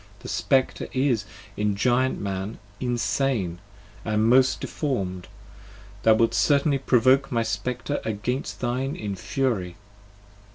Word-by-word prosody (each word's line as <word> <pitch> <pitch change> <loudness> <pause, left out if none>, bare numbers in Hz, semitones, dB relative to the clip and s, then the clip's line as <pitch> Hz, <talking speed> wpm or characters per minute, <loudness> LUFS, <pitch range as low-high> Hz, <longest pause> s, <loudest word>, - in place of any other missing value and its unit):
The - - -9
Spectre 130 -1 +1
is, 130 -5 +1 0.3
in 105 -1 0
Giant 125 +5 +1
Man, 100 +2 -4 0.2
insane, 120 -6 0 0.4
and 110 0 +1
most 130 +2 +4
deform'd. 95 - -3
5 - - -21 0.7
Thou 110 - +6
wilt 115 +1 +2
certainly 140 -1 +3
provoke 130 +1 +3
my 115 -2 +1
Spectre 125 +4 -3
against 110 +5 -3
thine 130 +3 -1
in 100 -2 -4
fury! 95 -4 -2
120 Hz, 120 wpm, -25 LUFS, 105-130 Hz, 0.7 s, Thou